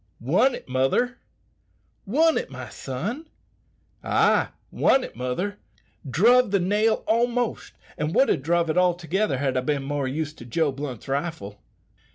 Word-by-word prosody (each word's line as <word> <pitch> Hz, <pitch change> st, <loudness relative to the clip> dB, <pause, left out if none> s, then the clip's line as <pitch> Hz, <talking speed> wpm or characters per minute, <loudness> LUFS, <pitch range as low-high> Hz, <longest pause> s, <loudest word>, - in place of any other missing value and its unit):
"Won 185 Hz, -, +2 dB
it, -, -, -11 dB
mother!" 135 Hz, -, 0 dB, 0.9 s
"Won 315 Hz, +9 st, +3 dB
it, -, -, -2 dB
my 130 Hz, -3 st, -8 dB
son?" 210 Hz, -, -5 dB, 0.7 s
"Ay, -, -, +3 dB, 0.2 s
won 265 Hz, -, +3 dB
it, -, -, -8 dB
mother. 125 Hz, -, -3 dB, 0.5 s
Druve 235 Hz, -, +4 dB
the 200 Hz, 0 st, +2 dB
nail 210 Hz, +5 st, +1 dB
almost, 240 Hz, +1 st, 0 dB, 0.3 s
and 150 Hz, +2 st, -2 dB
would 270 Hz, -, +5 dB
ha' 145 Hz, -, +1 dB
druve 170 Hz, +2 st, +1 dB
it 180 Hz, -, +2 dB
altogether 175 Hz, -2 st, +1 dB
had 135 Hz, -1 st, -1 dB
I 130 Hz, -, +1 dB
bin 140 Hz, +1 st, -1 dB
more 140 Hz, -1 st, -2 dB
used 150 Hz, +3 st, -4 dB
to 120 Hz, -, -10 dB
Joe 150 Hz, +5 st, 0 dB
Blunt's 135 Hz, -4 st, -7 dB
rifle." 135 Hz, -8 st, -4 dB
165 Hz, 150 wpm, -24 LUFS, 135-220 Hz, 0.9 s, would